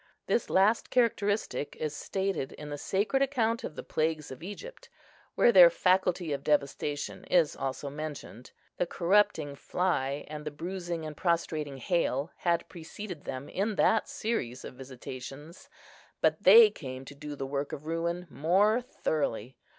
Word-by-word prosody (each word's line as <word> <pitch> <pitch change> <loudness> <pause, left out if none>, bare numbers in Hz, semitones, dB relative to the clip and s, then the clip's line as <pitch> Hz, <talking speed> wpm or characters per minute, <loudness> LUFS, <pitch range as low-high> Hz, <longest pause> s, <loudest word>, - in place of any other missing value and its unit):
This 235 - 0
last 205 +4 +3
characteristic 210 - 0
is 155 -1 -3
stated 190 -5 -2
in 150 0 -9
the 145 - -3
sacred 210 - 0
account 235 -4 +1
of 150 - -6
the - - -6
plagues 155 -2 -1
of 130 - -9
Egypt, 445 - -9 0.5
where 240 - +5
their 180 -5 +9
faculty 180 -2 +1
of 140 -1 -4
devastation 145 0 -1
is 170 -4 +3
also 135 +1 -4
mentioned. 145 -4 -7 0.3
The 180 - 0
corrupting 175 -5 +2
fly 145 -4 -1
and 150 0 -7
the 150 - -3
bruising 170 +1 -5
and 155 -1 -6
prostrating 155 -4 -1
hail 140 +1 0
had 170 -1 0
preceded 175 0 -8
them 130 +2 -5
in 205 +2 -1
that 220 +2 +3
series 130 - -3
of - - -8
visitations, 135 +4 -9 0.5
but - - +2
they 455 -2 +9
came 130 -2 -8
to 140 - -10
do 145 +1 -7
the 135 - -4
work 140 +1 -3
of 150 - -7
ruin 170 +2 -2
more 195 - +2
thoroughly. 130 - -2
160 Hz, 150 wpm, -29 LUFS, 145-195 Hz, 0.5 s, their